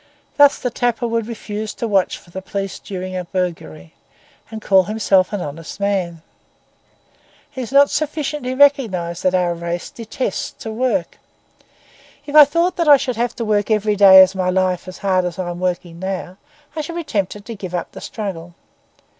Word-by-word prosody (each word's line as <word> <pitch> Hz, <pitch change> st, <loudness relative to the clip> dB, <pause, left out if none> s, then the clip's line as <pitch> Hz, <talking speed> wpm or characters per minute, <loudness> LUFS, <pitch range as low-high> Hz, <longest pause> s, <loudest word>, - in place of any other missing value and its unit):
Thus 285 Hz, -1 st, +6 dB
the 250 Hz, -, -3 dB
tapper 240 Hz, 0 st, -1 dB
would 230 Hz, -1 st, -2 dB
refuse 215 Hz, -2 st, -6 dB
to 230 Hz, -, -3 dB
watch 195 Hz, -3 st, +1 dB
for 175 Hz, -, -19 dB
the 190 Hz, -, -6 dB
police 195 Hz, -1 st, -5 dB
during 185 Hz, -1 st, -6 dB
a 180 Hz, -, -3 dB
burglary, 165 Hz, -, -5 dB, 0.6 s
and 220 Hz, 0 st, -7 dB
call 190 Hz, -3 st, +3 dB
himself 200 Hz, -3 st, +2 dB
a 205 Hz, -, -2 dB
honest 165 Hz, +3 st, -7 dB
man. 185 Hz, -5 st, -2 dB, 1.3 s
It 260 Hz, -, -4 dB
is 245 Hz, -, -6 dB
not 280 Hz, +1 st, +5 dB
sufficiently 295 Hz, -4 st, -2 dB
recognised 220 Hz, -12 st, +2 dB
that 185 Hz, 0 st, +1 dB
our 175 Hz, -1 st, +1 dB
race 170 Hz, +1 st, -5 dB
detests 230 Hz, -2 st, -4 dB
to 220 Hz, -, -5 dB
work. 220 Hz, -7 st, -1 dB, 1.1 s
If 290 Hz, -, -8 dB
I 300 Hz, -1 st, +10 dB
thought 335 Hz, +6 st, 0 dB
that 335 Hz, -2 st, 0 dB
I 290 Hz, -1 st, +9 dB
should 255 Hz, -2 st, -3 dB
have 235 Hz, 0 st, -1 dB
to 230 Hz, -, -4 dB
work 210 Hz, -1 st, 0 dB
every 210 Hz, -1 st, +1 dB
day 190 Hz, -2 st, +9 dB
of 185 Hz, -, 0 dB
my 185 Hz, -1 st, -1 dB
life 185 Hz, -1 st, 0 dB
as 185 Hz, -, -8 dB
hard 185 Hz, -2 st, +1 dB
as 175 Hz, -1 st, -4 dB
I 180 Hz, -2 st, -3 dB
am 175 Hz, -, -7 dB
working 175 Hz, -2 st, -3 dB
now, 190 Hz, -1 st, -5 dB, 0.4 s
I 310 Hz, -, -2 dB
should 335 Hz, +3 st, -7 dB
be 340 Hz, -, -3 dB
tempted 205 Hz, -, -3 dB
to 230 Hz, -, -6 dB
give 185 Hz, -4 st, -6 dB
up 175 Hz, -, -4 dB
the -, -, -10 dB
struggle. 175 Hz, -6 st, -6 dB
200 Hz, 190 wpm, -19 LUFS, 180-235 Hz, 1.3 s, I